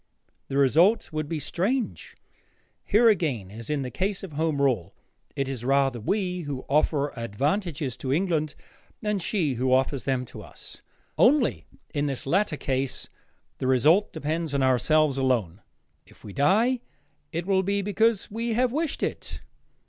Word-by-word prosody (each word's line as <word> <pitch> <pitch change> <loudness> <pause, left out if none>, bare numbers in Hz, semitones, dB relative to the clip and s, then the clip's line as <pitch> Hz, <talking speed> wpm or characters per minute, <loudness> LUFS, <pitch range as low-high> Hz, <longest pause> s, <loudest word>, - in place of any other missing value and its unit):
The 135 - -2
result 165 - +4
would 155 -1 -3
be 165 - -2
strange. 205 - -2 0.7
Here 225 +3 +4
again, 145 - +1
as 110 +1 -9
in 150 -2 0
the 125 - -5
case 195 +1 -2
of 190 - -7
Home 155 -1 0
Rule, 125 -11 0 0.4
it 135 -1 -1
is 130 -3 -5
rather 135 -1 +2
we 180 - -1
who 140 -4 -5
offer 145 0 +1
advantages 140 - -2
to 130 - -3
England 155 -2 0 0.5
than 210 -1 0
she 170 -6 0
who 130 +2 0
offers 130 +1 +1
them 130 -2 0
to - - -10
us. - - -11 0.4
Only, 265 -1 +4 0.3
in 145 -1 0
this 135 -3 -4
latter 170 +1 +1
case, 135 -1 -2 0.5
the 130 - -1
result 155 - +4
depends 160 0 -2
on 135 - +2
ourselves 135 +2 +3
alone. 115 -9 0 0.5
If - - -21
we 100 - -9
die, 220 - +3 0.5
it 170 +1 -3
will 190 -1 +3
be 200 +1 -1
because 220 +1 +1
we 230 +2 -2
have 245 +2 +2
wished 310 +2 -2
it. - - -4
150 Hz, 155 wpm, -26 LUFS, 130-195 Hz, 0.7 s, result